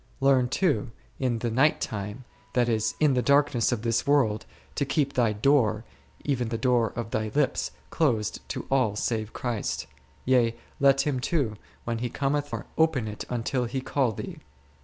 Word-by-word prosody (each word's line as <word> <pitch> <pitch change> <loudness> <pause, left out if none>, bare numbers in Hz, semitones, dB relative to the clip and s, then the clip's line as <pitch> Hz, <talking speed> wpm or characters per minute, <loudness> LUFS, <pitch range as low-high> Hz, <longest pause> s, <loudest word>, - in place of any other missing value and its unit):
Learn 135 -2 +4
too 145 - +1 0.3
in 125 -3 0
the 115 0 -2
night 135 +7 +3
time, 105 +4 -5 0.3
that 120 -1 +3
is, 110 -1 0
in 150 -3 +4
the 125 - +2
darkness 140 -2 +3
of 115 -3 -2
this 115 +1 0
world, 130 -7 +2 0.3
to 145 - 0
keep 140 0 0
thy 120 -3 +2
door, 110 -1 +2 0.4
even 125 -5 0
the 115 - -2
door 120 -1 +2
of 115 -1 -4
thy 110 0 -1
lips, 145 -2 +1 0.2
closed 120 -10 +1
to - - -4
all 125 -6 +2
save 110 0 -1
Christ: 120 -4 -3 0.4
yea, 120 -3 +3 0.2
let 135 -1 +5
Him 140 -4 0
too, 125 -5 0 0.3
when 115 -1 -2
He 120 +1 -2
cometh, 145 +3 -1
find - - -4
it - - -15
closed, - - -30
nor - - +8
open 140 -9 0
it 105 0 -6
until 125 +1 -1
He 125 +3 -2
call 130 -2 0
thee. 105 - -7
125 Hz, 185 wpm, -27 LUFS, 115-140 Hz, 0.4 s, nor